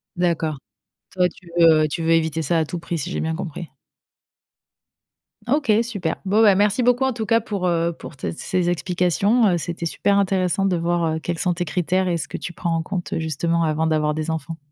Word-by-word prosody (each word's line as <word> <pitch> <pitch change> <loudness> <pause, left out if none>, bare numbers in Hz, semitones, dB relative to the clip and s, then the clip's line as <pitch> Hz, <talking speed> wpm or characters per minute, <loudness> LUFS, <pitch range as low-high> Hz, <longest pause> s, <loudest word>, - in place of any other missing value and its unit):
D'accord. 165 -4 0 0.5
Toi 180 -1 +2
tu 180 - -17
veux, 165 -2 +6
heu, - - 0
tu 160 +3 -4
veux 165 0 +2
éviter 160 -1 +1
ça 165 +3 +1
à 160 - +2
tout 175 +3 -5
prix? 170 +1 -4
Si 140 - -4
j'ai - - -2
bien 160 0 -1
compris. 170 -1 -6 1.8
OK, 270 -1 +1
super, 200 -9 -3
bon 205 +3 +3
bah, 205 -3 +6
merci 205 +5 +2
beaucoup 245 +2 +3
en 265 - 0
tout 225 -2 -4
cas 230 +1 +3
pour, 205 -5 -3
heu, 170 -1 +1
pour 145 - -10
tes - - -3
ces 175 +1 -1
explications 180 +6 +2
heu, 180 -3 +2
c'était 170 +1 -4
super 200 +4 +1
intéressant 190 -1 +1
de 190 -2 +2
voir, 170 0 0
heu, - - -3
quels 170 +1 -4
sont 180 -2 +1
tes 175 +1 -2
critères 180 +3 0
et 170 - +1
ce - - -5
que - - -8
tu - - -6
prends 170 -1 -2
en 165 - 0
compte, 175 +1 -4
heu, - - -1
justement, 165 +2 0
avant 160 0 0
d'avoir 155 -1 +1
des 155 +1 -3
enfants. 160 +1 -4
175 Hz, 225 wpm, -22 LUFS, 160-190 Hz, 1.8 s, veux